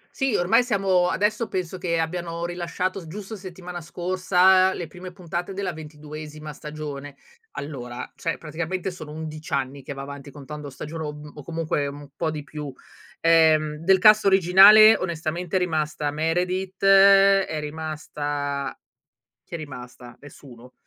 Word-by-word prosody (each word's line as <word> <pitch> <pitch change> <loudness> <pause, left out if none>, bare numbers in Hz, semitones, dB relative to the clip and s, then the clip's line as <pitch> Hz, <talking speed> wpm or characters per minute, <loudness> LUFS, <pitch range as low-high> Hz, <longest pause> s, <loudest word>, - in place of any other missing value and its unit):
Sì, 270 -4 0
ormai 225 +8 +3
siamo 195 -6 +2
adesso 210 +2 0
penso 185 0 -4
che 170 -2 -1
abbiano 170 0 -3
rilasciato 175 +2 -3
s 175 - -9
giusto 200 +6 -7
settimana 180 -2 -8
scorsa 185 +2 +3
le 175 - -5
prime 180 +3 -10
puntate 175 0 -5
della 195 -1 -3
ventiduesima 155 0 -9
stagione. 145 -1 -8 0.4
Allora, 125 -4 -7
cioè 165 - -2
praticamente 170 +4 -4
sono 155 -4 -9
11 155 0 -8
anni 135 0 -2
che 135 - -7
va 135 0 -7
avanti, 140 0 -9
contando 145 0 -9
stagione, 155 +4 -7
o 150 - -4
m 150 0 -11
o 150 - -10
comunque 160 -3 -2
un 145 0 -8
po' 160 - -1
di 155 -1 -5
più. 150 -1 -7 0.5
Ehm, 160 -2 +4
del 185 +5 +3
cast 215 +2 +6
originale 195 +3 +8
onestamente 170 0 -3
è - - +5
rimasta 155 -4 -1
Meredith, 180 +5 -2
è 195 -3 +6
rimasta 145 -2 -4 0.7
chi - - -11
è - - -3
rimasta? 125 -4 -10
Nessuno. 130 -3 -14
165 Hz, 145 wpm, -24 LUFS, 150-185 Hz, 0.7 s, originale